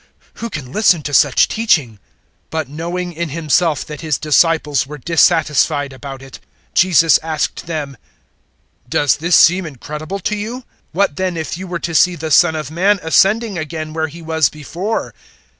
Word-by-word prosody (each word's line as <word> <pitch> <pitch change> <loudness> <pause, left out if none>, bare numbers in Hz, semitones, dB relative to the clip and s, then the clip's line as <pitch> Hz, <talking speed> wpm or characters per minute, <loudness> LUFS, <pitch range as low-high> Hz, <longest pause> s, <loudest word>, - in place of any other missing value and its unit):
Who 230 - -3
can 140 - -7
listen 175 -4 +3
to 145 - -5
such 140 -1 +4
teaching?" 170 - +1
006:061 105 - -21 0.5
But, 160 -4 -3
knowing 175 +4 -4
in 170 0 -4
Himself 160 0 0
that 150 -1 -8
His 155 -2 -1
disciples 150 -2 +2
were 150 +1 -8
dissatisfied 150 -3 +2
about 135 0 -9
it, 135 - -12 0.3
Jesus 165 -3 +4
asked 160 0 -3
them, 150 -5 -4 0.9
006:062 - - -28
"Does 145 - +2
this 170 +3 +2
seem 180 +1 +5
incredible 150 +6 -6
to 210 - -1
you? 230 +5 -5 0.3
What 170 -4 0
then 185 -2 -2
if 160 0 -4
you 185 +2 -7
were 175 -1 -3
to 170 0 -5
see 180 +2 +4
the 160 -1 -5
Son 160 +2 +5
of 155 -2 -5
Man 195 +5 +2
ascending 195 +4 +2
again 155 0 -5
where 160 0 -1
He 165 +2 -11
was 160 -2 +1
before? 175 +8 -4
160 Hz, 175 wpm, -17 LUFS, 150-175 Hz, 0.9 s, seem